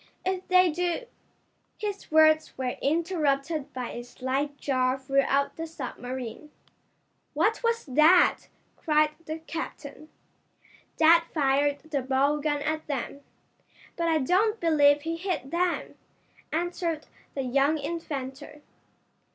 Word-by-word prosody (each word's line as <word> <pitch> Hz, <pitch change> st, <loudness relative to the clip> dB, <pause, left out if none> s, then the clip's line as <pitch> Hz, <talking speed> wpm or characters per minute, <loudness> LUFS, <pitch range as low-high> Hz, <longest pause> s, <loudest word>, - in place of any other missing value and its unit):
"If 375 Hz, 0 st, -2 dB
they 365 Hz, -1 st, +5 dB
do 355 Hz, +8 st, -2 dB, 0.4 s
" -, -, -43 dB, 0.3 s
His 410 Hz, -2 st, -5 dB
words 310 Hz, 0 st, +4 dB
were 255 Hz, -1 st, -2 dB
interrupted 310 Hz, -2 st, 0 dB
by 255 Hz, -1 st, -5 dB
a 240 Hz, -, -6 dB
slight 270 Hz, +4 st, -3 dB
jar 255 Hz, -2 st, 0 dB
throughout 275 Hz, +1 st, +1 dB
the 325 Hz, 0 st, -4 dB
submarine. 255 Hz, -2 st, -7 dB, 0.9 s
"What 440 Hz, +1 st, +1 dB
was 465 Hz, 0 st, 0 dB
that?" 310 Hz, +6 st, +4 dB, 0.3 s
cried 305 Hz, -1 st, +2 dB, 0.2 s
the 315 Hz, +1 st, -3 dB
captain. 320 Hz, -2 st, -7 dB, 0.9 s
"Dad 335 Hz, +1 st, +6 dB
fired 285 Hz, 0 st, +2 dB
the 305 Hz, -3 st, -3 dB
bow 270 Hz, +3 st, +1 dB
gun 295 Hz, -1 st, -1 dB
at 310 Hz, +1 st, -2 dB
them, 280 Hz, 0 st, -4 dB, 0.7 s
but 335 Hz, -1 st, -1 dB
I 325 Hz, -1 st, +3 dB
don't 390 Hz, -, +2 dB
believe 295 Hz, -3 st, +4 dB
he 330 Hz, +1 st, -3 dB
hit 335 Hz, -7 st, -3 dB
them," 350 Hz, +1 st, -1 dB, 0.6 s
answered 335 Hz, -1 st, -2 dB, 0.3 s
the 270 Hz, -, -2 dB
young 275 Hz, +5 st, +2 dB
inventor. 290 Hz, -2 st, -6 dB
305 Hz, 120 wpm, -27 LUFS, 275-335 Hz, 0.9 s, Dad